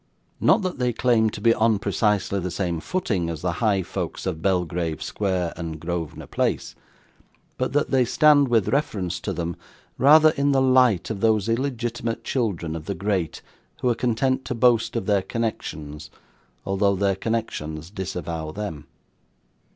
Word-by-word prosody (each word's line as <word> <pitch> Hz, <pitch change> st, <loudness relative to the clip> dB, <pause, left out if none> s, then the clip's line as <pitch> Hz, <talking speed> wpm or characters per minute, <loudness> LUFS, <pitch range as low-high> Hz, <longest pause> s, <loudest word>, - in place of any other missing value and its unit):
Not 220 Hz, -, +4 dB
that 185 Hz, -7 st, -3 dB
they 125 Hz, -1 st, +1 dB
claim 115 Hz, -2 st, +3 dB
to 105 Hz, -, -7 dB
be 115 Hz, +2 st, +4 dB
on 110 Hz, -1 st, +2 dB
precisely 100 Hz, 0 st, 0 dB
the 90 Hz, 0 st, -3 dB
same 85 Hz, -1 st, -2 dB
footing 100 Hz, -, -1 dB
as 80 Hz, -1 st, -5 dB
the 90 Hz, -, +1 dB
high 100 Hz, -4 st, +2 dB
folks -, -, -5 dB
of 80 Hz, -, -3 dB
Belgrave 90 Hz, -3 st, -1 dB
Square 95 Hz, -4 st, -1 dB
and 80 Hz, -2 st, -6 dB
Grosvenor 85 Hz, -1 st, -4 dB
Place, -, -, -1 dB, 0.8 s
but -, -, -2 dB
that 145 Hz, -, +1 dB
they 130 Hz, -2 st, +4 dB
stand, 145 Hz, +3 st, +5 dB
with 115 Hz, -4 st, +2 dB
reference 95 Hz, -, -1 dB
to -, -, -4 dB
them, 85 Hz, -1 st, -3 dB, 0.4 s
rather 155 Hz, +4 st, +7 dB
in 140 Hz, -1 st, +1 dB
the 135 Hz, -, +3 dB
light 130 Hz, -7 st, +3 dB
of 105 Hz, -, -4 dB
those 110 Hz, -1 st, +2 dB
illegitimate 115 Hz, -2 st, -2 dB
children 100 Hz, -, -2 dB
of 80 Hz, -1 st, -7 dB
the 100 Hz, -, -2 dB
great 95 Hz, -3 st, -2 dB, 0.4 s
who 125 Hz, -, +2 dB
are -, -, +3 dB
content 130 Hz, +3 st, 0 dB
to 125 Hz, -, -3 dB
boast 115 Hz, -1 st, +3 dB
of 115 Hz, -, -1 dB
their 100 Hz, -2 st, +2 dB
connections, 75 Hz, -9 st, -4 dB, 0.6 s
although 100 Hz, +1 st, +2 dB
their 100 Hz, 0 st, +1 dB
connections 90 Hz, -7 st, -3 dB
disavow 85 Hz, -5 st, -4 dB
them. 80 Hz, -7 st, -6 dB
105 Hz, 160 wpm, -24 LUFS, 85-120 Hz, 0.8 s, rather